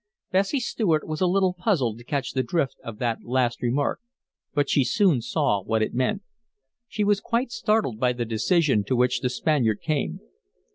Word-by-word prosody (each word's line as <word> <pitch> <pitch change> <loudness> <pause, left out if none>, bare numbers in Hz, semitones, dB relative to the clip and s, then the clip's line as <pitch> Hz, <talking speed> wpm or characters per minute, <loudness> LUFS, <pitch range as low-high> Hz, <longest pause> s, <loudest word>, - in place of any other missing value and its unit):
Bessie 195 +9 +2
Stuart 195 -10 0
was 155 +1 -4
a 185 - +4
little 185 0 +2
puzzled 165 - 0
to - - -12
catch 140 +2 -2
the 130 - 0
drift 135 +2 -1
of 115 -2 -7
that 120 -1 -1
last 125 -1 0
remark. 130 +4 0 0.6
But 145 -1 +2
she 140 - +3
soon 145 - +2
saw 105 -3 0
what 110 +3 0
it - - -3
meant. 130 - 0 0.6
She 215 - -2
was 205 -1 +2
quite 240 +1 -1
startled 210 - 0
by 125 0 +2
the 120 -1 -3
decision 125 - +2
to 130 - 0
which 125 +1 +2
the 125 - -1
Spaniard 125 -5 +1
came. 140 - -1
135 Hz, 185 wpm, -25 LUFS, 120-185 Hz, 0.6 s, a